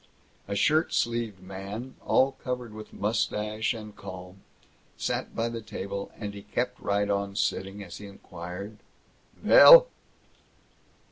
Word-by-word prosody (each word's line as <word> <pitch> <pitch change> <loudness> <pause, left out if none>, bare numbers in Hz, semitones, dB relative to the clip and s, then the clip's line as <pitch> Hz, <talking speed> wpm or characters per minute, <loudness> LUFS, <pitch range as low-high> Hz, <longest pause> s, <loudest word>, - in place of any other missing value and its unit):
A 100 - -3
shirt 155 - +2
sleeved 115 -5 -1
man, 100 +7 -7
all 135 +1 +3
covered 125 -3 -4
with 110 0 -10
mustache 105 0 -1
and 105 -2 -9
calm, 90 0 -10 0.6
sat - - -3
by 115 +1 0
the 115 -1 -5
table, 100 -2 -6
and 105 -2 -5
he 100 - -9
kept - - -3
right 100 0 0
on 100 -1 -1
sitting 95 +1 -2
as 85 -3 -9
he 105 - -9
inquired: 95 +2 -9 0.6
"Vell?" - - +9
105 Hz, 130 wpm, -27 LUFS, 100-115 Hz, 0.6 s, Vell